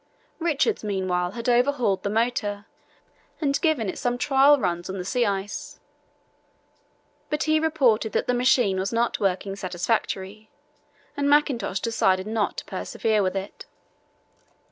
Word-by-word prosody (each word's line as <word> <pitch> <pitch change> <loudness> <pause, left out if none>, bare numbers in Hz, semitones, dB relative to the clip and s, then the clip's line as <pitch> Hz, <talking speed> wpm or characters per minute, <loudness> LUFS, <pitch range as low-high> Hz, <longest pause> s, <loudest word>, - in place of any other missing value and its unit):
Richards 340 - 0
meanwhile 185 -3 -1
had 235 +1 -6
overhauled 245 -4 +2
the 200 - -2
motor 210 -2 -1 0.7
and 280 -2 0
given 310 - +1
it 185 - -4
some 245 0 -1
trial 275 +2 +5
runs 175 -7 -2
on 190 - -4
the 180 - -5
sea 240 +3 +1
ice. 200 0 -4 1.5
But 300 -1 -1
he 310 0 +2
reported 265 -9 +2
that - - 0
the 250 - +1
machine 245 -6 +3
was 190 +1 -2
not 235 +1 0
working 195 -1 -1
satisfactorily, 195 +2 -3 0.7
and 285 -1 0
Mackintosh 265 -10 +2
decided 190 -5 +1
not 215 -1 -1
to - - -5
persevere 220 -2 -1
with 185 0 -1
it. 195 +1 -6
220 Hz, 140 wpm, -24 LUFS, 195-265 Hz, 1.5 s, trial